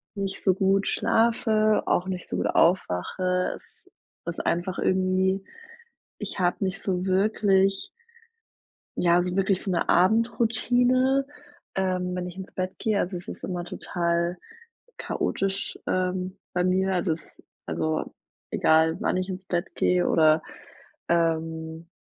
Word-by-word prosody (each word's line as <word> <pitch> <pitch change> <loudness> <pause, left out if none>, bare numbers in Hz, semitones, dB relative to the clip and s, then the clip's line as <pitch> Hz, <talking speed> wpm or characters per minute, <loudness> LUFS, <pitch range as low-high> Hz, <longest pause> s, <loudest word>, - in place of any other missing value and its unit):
nicht 195 -1 -4
so 190 - +4
gut 195 +1 +2
schlafe, 220 -2 +2
auch 180 +2 +1
nicht 185 -2 -4
so - - -3
gut - - 0
aufwache. 180 - +1
Es - - -21 0.4
ist 170 0 -4
einfach 175 +2 -1
irgendwie 190 +1 +1 0.8
ich - - -5
habe 175 -1 +2
nicht 190 +3 -3
so 185 -2 -1
wirklich 195 - +2 1.1
ja, 175 0 +4
so 180 0 -3
wirklich 195 -1 +1
so 195 - -2
'ne 175 - 0
Abendroutine, 245 +6 +3 0.5
ähm, 185 -1 -1
wenn 180 0 -3
ich 180 - -9
ins 190 0 -8
Bett 185 0 -3
gehe. 215 -2 0
Also, 180 +1 -1
es 175 - -11
ist - - -8
immer 180 -2 -3
total 170 0 -1 0.6
chaotisch, 195 0 -2
ähm, 185 +1 -1 0.2
bei 180 -1 +1
mir. 190 +1 +2
Also, 175 -2 +1
es 160 - -9 0.4
also 80 -1 -2 0.4
egal 160 +1 +3
wann - - 0
ich 185 +1 -2
ins 185 0 -6
Bett 175 0 -2
gehe 180 0 +2
oder, 155 0 +4 0.7
ähm, 165 -1 -1
185 Hz, 135 wpm, -26 LUFS, 175-195 Hz, 1.1 s, so